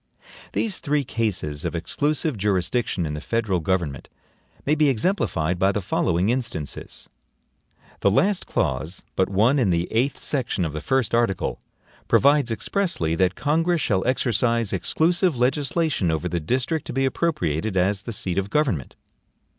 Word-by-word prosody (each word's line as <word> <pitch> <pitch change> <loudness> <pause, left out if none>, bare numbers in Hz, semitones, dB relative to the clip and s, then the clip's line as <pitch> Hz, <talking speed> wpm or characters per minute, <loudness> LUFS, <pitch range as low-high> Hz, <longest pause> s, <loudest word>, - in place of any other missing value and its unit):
These 210 -6 -1
three 145 -1 0
cases 95 - -2
of - - -3
exclusive 150 0 -1
jurisdiction 95 -1 0
in 75 - -3
the 75 - -5
federal 110 -4 0
government 85 -6 -2 0.6
may 145 - +3
be 155 -1 +3
exemplified 105 - 0
by 95 +1 +4
the 105 - -1
following 90 0 0
instances: 120 - -4 0.9
The - - +3
last 190 - +2
clause 75 +4 -2
but 95 - +2
one 110 +9 +3
in 115 -7 +2
the 85 0 +1
eighth 125 +5 +1
section 120 - -1
of 75 - -4
the 75 - -4
first 130 +1 0
article 115 -6 0 0.5
provides 140 -2 +4
expressly 115 - -1
that 90 +1 +1
Congress 165 +3 +1
shall 95 -3 +1
exercise 115 -3 +1
"EXCLUSIVE 170 - +1
LEGISLATION" 135 - +1
over 80 +2 -1
the 85 -1 -1
district 130 - -1
to - - -5
be 135 +1 +1
appropriated 105 - -1
as 95 +2 +2
the 115 - -6
seat 95 -3 -1
of 100 +1 -3
government. 125 - 0
110 Hz, 150 wpm, -23 LUFS, 90-140 Hz, 0.9 s, by